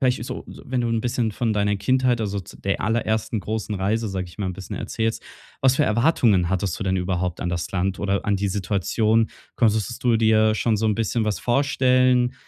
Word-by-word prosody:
vielleicht 125 -3 +1
so, - - -6
wenn 130 -1 -4
du 120 - 0
'n 115 -1 0
bisschen 120 -1 -1
von 110 +2 -1
deiner 105 -1 +1
Kindheit, 125 +3 +1
also 100 -2 -2
z 90 - -14
der 100 0 0
allerersten 110 0 0
großen 105 +1 -3
Reise, 105 +4 0
sage 95 -2 -3
ich 85 - -15
mal, 100 - -2
'n 95 - -2
bisschen 95 0 -8
erzählst, 115 0 -2 0.4
was 135 -1 +4
für 150 - +3
Erwartungen 115 - +3
hattest 95 -1 -1
du - - -1
denn 95 -1 0
überhaupt 90 -1 -2
an 90 - -2
das 85 -1 -3
Land 95 +1 -1
oder 100 -1 -1
an 105 - +1
die 100 +1 -1
Situation? 105 +3 +1 0.2
Konntest 110 +1 0
du 120 -2 +3
dir 110 -1 +3
schon 110 -1 +1
so 110 +2 0
'n 105 -2 +1
bisschen 115 0 0
was 105 -1 -1
vorstellen, 130 -1 +2
110 Hz, 210 wpm, -23 LUFS, 100-120 Hz, 0.4 s, was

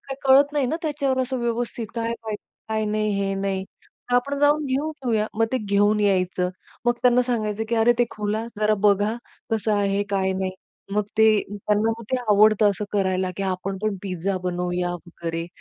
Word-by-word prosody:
काही 270 - -4
कळत 280 +2 +6
नाही 285 -3 +1
ना, 310 - -1
त्याच्यावर 280 -4 0
असं 255 0 -3
व्यवस्थित 235 -1 -2
काय 230 0 -1
पाहिजे 215 -2 -4 0.3
काय 220 0 0
नाही 215 0 0
हे 195 0 0
नाही, 195 -1 -2 0.5
तर - - +2
आपण 280 +3 0
जाऊन 295 +1 +3
घेऊन 280 +4 -1
येऊया." 220 -3 +1
मग 225 +1 +2
ते 260 - +2
घेऊन 205 0 +2
यायचं 185 -2 +1 0.4
मग 240 - +4
त्यांना 250 0 +5
सांगायचं, 220 -3 -1
की 235 - 0
"अरे 225 +2 +5
ते 240 - +5
खुला 215 +1 -2
जरा 215 0 +3
बघा, 205 +2 +2 0.4
कसं 220 -1 0
आहे, 200 0 +1
काय 190 -1 +1
नाही." 190 0 -2 0.4
मग 210 0 +1
ते 220 - +7 0.2
त्यांना 210 +2 0 0.2
ते 260 - +2
आवडतं 210 0 +5
असं 205 +1 -3
करायला, 190 -2 +1
की 195 - -3
आपण 190 0 -2
पण 215 -2 0
पिझ्झा 190 0 -2
बनवूया 180 0 -1
वगैरे. 165 -1 -5
210 Hz, 185 wpm, -24 LUFS, 195-240 Hz, 0.5 s, ते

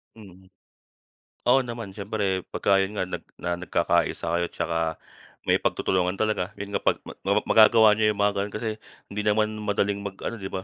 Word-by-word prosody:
Mm. 95 -4 -15 1.0
Oo, 125 +2 +5
naman 115 -4 -6
siyempre 100 -2 -2
pagka 100 -1 +2
yun 95 +2 -1
nga 95 - 0
nag 90 - -5
na 85 0 -3
nagkakaisa 85 -2 0
kayo 85 0 +1
tsaka 80 -1 -2 0.5
may - - +3
pagtutulungan 90 0 0
talaga. 105 -2 -1
Yun 100 0 -7
nga - - 0
pag - - +2
ma - - -9 0.2
mapap - - +2
magagawa 110 0 +7
niyo 105 0 +3
yung 100 - -2
mga 105 0 +3
ganon 100 +1 -3
kasi 110 +1 -2 0.4
hindi 105 +1 -2
naman 110 +1 +1
madaling 100 -1 0
mag 95 -1 -5
ano, 115 - -3
di 95 - -5
ba? 95 -1 -5
100 Hz, 185 wpm, -25 LUFS, 95-110 Hz, 1.0 s, magagawa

